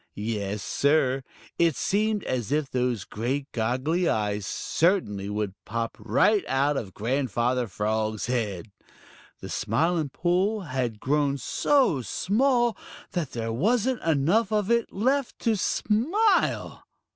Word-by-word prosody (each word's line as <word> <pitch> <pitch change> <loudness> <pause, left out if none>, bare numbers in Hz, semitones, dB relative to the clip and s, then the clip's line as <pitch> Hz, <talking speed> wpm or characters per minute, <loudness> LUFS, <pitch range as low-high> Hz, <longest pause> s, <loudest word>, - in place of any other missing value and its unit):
Yes, 105 -1 -3
Sir, 140 -2 +2 0.4
it 165 -4 +3
seemed 210 0 0
as 125 -2 -2
if 150 -1 +1
those 125 -4 0
great 130 +8 -3
goggly 130 +10 0
eyes 105 -1 -1
certainly 105 - 0
would 105 -2 -2
pop 115 +1 -3
right 210 0 +3
out 140 +2 +1
of 100 -8 -5
Grandfather 125 0 0
Frog's 110 +2 -1
head. 110 -5 -2 0.7
The - - -7
Smiling 165 -2 0
Pool 185 +8 0
had 130 - -3
grown 140 +1 +1
so 210 - +2
small 240 - +1 0.4
that 170 -7 -3
there 115 -1 -3
wasn't 235 - +1
enough 165 +8 +2
of 210 0 +1
it 235 -1 +2
left 260 +6 0
to 225 -2 +2
smile! 330 - +1
140 Hz, 120 wpm, -26 LUFS, -, 0.7 s, it